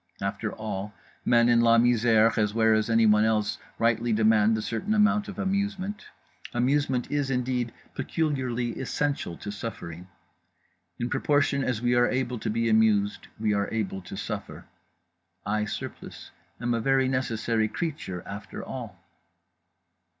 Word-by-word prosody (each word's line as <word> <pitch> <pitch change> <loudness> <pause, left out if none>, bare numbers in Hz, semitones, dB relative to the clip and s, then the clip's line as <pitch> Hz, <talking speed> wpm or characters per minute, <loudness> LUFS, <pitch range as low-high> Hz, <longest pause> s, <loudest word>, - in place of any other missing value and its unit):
After 100 +2 -3
all, 105 -1 -5 0.3
men 120 0 +5
in 120 -1 +5
La 115 0 +5
Misère 115 -2 +4
as 105 -1 0
well 110 -1 +4
as 110 +1 0
anywhere 110 -2 +5
else 110 -1 +1 0.2
rightly 115 +1 +1
demand 110 0 +4
a - - -2
certain 195 - -1
amount 210 -1 +3
of 200 - -8
amusement; 200 +1 -2 0.5
amusement 130 0 +1
is, 145 -2 0
indeed, 125 -2 -1 0.2
peculiarly 130 -7 -1
essential 145 - -2
to 100 - -6
suffering; 90 -5 -7 0.9
in 120 - -2
proportion 140 +1 +1
as 125 -3 -2
we 120 0 +3
are 120 0 +4
able 125 -2 -1
to - - -3
be 115 +2 0
amused 110 -2 +2
we 105 -1 +1
are 100 0 0
able 100 -3 -2
to 90 - -9
suffer; - - -6 0.8
I, 105 +1 0
Surplice, 105 - -7 0.3
am 120 +1 0
a 115 - 0
very 135 +1 +3
necessary 115 -3 0
creature 110 - -4
after 100 0 -7
all. 115 -8 -7
115 Hz, 145 wpm, -27 LUFS, 110-130 Hz, 0.9 s, men